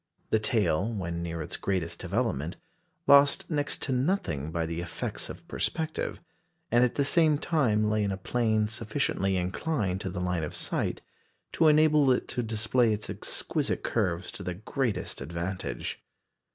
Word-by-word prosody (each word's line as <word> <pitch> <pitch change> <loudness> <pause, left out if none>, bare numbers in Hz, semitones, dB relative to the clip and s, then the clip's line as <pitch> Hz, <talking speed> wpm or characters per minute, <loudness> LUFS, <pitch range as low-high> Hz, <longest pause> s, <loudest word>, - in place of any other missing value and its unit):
The 110 - +4
tail, 105 -2 +1
when 85 -5 -3
near 85 -1 -3
its - - -4
greatest 90 -4 -1
development, 90 - -1 0.5
lost 140 +3 +5
next 145 -2 -1
to - - -2
nothing 125 - 0
by 85 0 -1
the 85 +1 -3
effects 85 - -4
of - - -9
perspective, 160 -1 -2 0.5
and 120 +1 +5
at 125 - +2
the 140 - +2
same 155 0 +4
time 120 -10 +2
lay 110 0 +1
in 100 - 0
a 95 - -2
plane 110 +1 +1
sufficiently 110 -4 -1
inclined 95 - -1
to 95 - -3
the 90 0 -4
line 90 -2 -1
of 75 - -4
sight - - -2 0.5
to 160 - +4
enable 150 -2 +5
it 125 - +1
to 125 - -1
display 115 +1 +2
its 105 0 -2
exquisite - - -2
curves 90 +1 0
to - - -7
the 90 -2 -3
greatest 115 - -2
advantage. 85 +6 -4
105 Hz, 160 wpm, -29 LUFS, 90-130 Hz, 0.5 s, lost